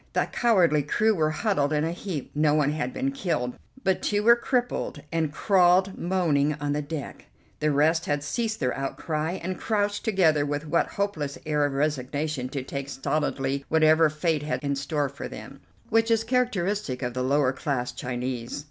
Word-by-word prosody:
The - - +2
cowardly 180 -11 +3
crew 215 +10 +2
were 155 -5 +1
huddled 155 -4 0
in 150 -1 +1
a 165 - 0
heap; 175 -5 -5
no 150 0 +3
one 145 -1 +2
had 145 -4 -2
been 270 - -1
killed, 165 - -2 0.3
but 190 -4 +1
two 205 0 0
were 235 +2 +7
crippled 245 - -2
and 160 -3 0
crawled 185 +2 +3
moaning 155 -5 +1
on 145 0 -2
the 150 - -1
deck; 145 0 -6 0.3
the 155 - +1
rest 155 +3 +2
had 145 0 0
ceased 220 +8 -2
their 125 -3 0
outcry 155 +4 -2
and 185 0 -4
crouched 205 -2 0
together 175 -9 +3
with 145 +1 -3
that 170 - +3
hopeless 155 -9 -2
air 150 -1 +1
of 145 - -2
resignation 145 -1 -1
to 135 -1 -4
take 140 +1 -5
stolidly 140 -1 -1
whatever 160 0 +5
fate 155 0 0
had 150 0 -3
in 140 -1 0
store 145 +1 -1
for - - -7
them, - - -10 0.3
which 225 +1 +3
is 225 -1 +3
characteristic 210 - 0
of 125 0 -2
the 125 - -2
lower 135 0 +2
class 135 -2 -2
Chinese. 125 0 -4
155 Hz, 180 wpm, -26 LUFS, 140-185 Hz, 0.3 s, were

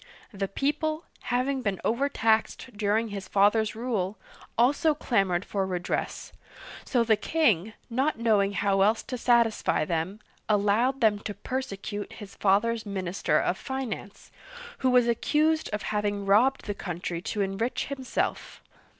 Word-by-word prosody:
The 195 -1 -2
people, 305 - -1 0.2
having 255 +2 0
been 200 -5 -1
overtaxed 230 -1 +1
during 215 +2 +1
his 200 -2 -6
father's 210 +3 +3
rule, 215 -5 -2 0.4
also 285 +6 +3
clamored 195 -10 +1
for 195 -2 -1
redress, 180 -1 -3 0.5
so 240 -2 +1
the 225 -1 +4
king, 220 - +1
not 265 +5 0
knowing 210 -4 +2
how 195 -1 +1
else 215 +3 +3
to 255 - -5
satisfy 235 -8 +2
them, 170 +5 -2 0.3
allowed 215 +6 +2
them 215 -2 +4
to 205 0 -6
persecute 205 -3 -5
his 205 -3 -10
father's 215 +3 +2
minister 190 -6 -1
of 185 - -1
finance, 260 -7 -6 0.5
who 260 - +2
was 250 -1 +4
accused 310 +7 +1
of 210 - -3
having 205 -1 -1
robbed 235 +7 +3
the 205 - -2
country 175 -3 -4
to 205 +3 -3
enrich 200 +5 -1
himself. 265 -2 -3
215 Hz, 135 wpm, -27 LUFS, 200-250 Hz, 0.5 s, the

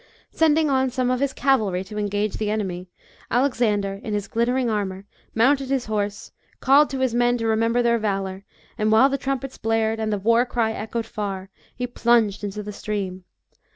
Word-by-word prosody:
Sending 315 -1 +3
on 265 -2 +2
some 255 0 0
of 255 - 0
his 280 0 0
cavalry 220 -11 +1
to 210 +2 -7
engage 205 0 -1
the 215 -1 -2
enemy, 185 -4 -3 0.4
Alexander, 215 -6 +1
in 210 - -3
his 205 -1 -3
glittering 245 +2 0
armour, 200 -3 -2 0.3
mounted 270 +4 +3
his 270 -2 0
horse, 205 -1 -3 0.3
called 280 +3 +5
to 270 - -4
his 260 -3 +1
men 245 0 +2
to 230 - -3
remember 230 +2 +2
their 235 0 +2
valour, 195 -2 -2 0.4
and 215 0 +2
while 225 +5 +6
the 275 - -1
trumpets 270 -1 -3
blared, 225 0 0
and 220 -1 -1
the 205 - 0
war 230 +4 +3
cry 235 -3 0
echoed 220 +1 -4
far, 195 -3 -5 0.2
he 250 - -2
plunged 235 -4 +2
into 205 +1 -4
the 210 0 -7
stream. 195 -4 -4
225 Hz, 185 wpm, -23 LUFS, 205-250 Hz, 0.4 s, while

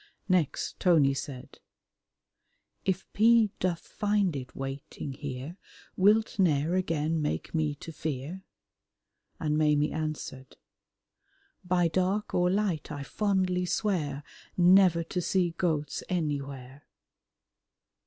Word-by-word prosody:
Next 180 -7 0
Tony 155 -7 +4
said, 135 -2 -7 1.3
"If 190 0 0
P. 225 -1 +5
doth 180 -2 0
find 205 -5 0
it 130 -2 -7
waiting 135 +1 -6
here, 140 +4 -6 0.4
Wilt 210 +2 +3
ne'er 160 -3 +2
again 165 -3 0
make 150 - -3
me 155 -2 0
to 165 - -9
fear?" 155 +4 -5 1.0
And 150 -1 0
Maimie 150 -1 +3
answered, 155 -4 -5 1.1
"By 180 -1 +2
dark 185 +5 0
or 180 0 +3
light 190 -5 -1
I 145 - -5
fondly 185 +2 0
swear 165 -8 -1 0.3
Never 180 -1 +6
to 180 +2 -3
see 180 -1 +1
goats 160 -4 -1
anywhere." 140 -5 -4
165 Hz, 105 wpm, -29 LUFS, 145-185 Hz, 1.3 s, Never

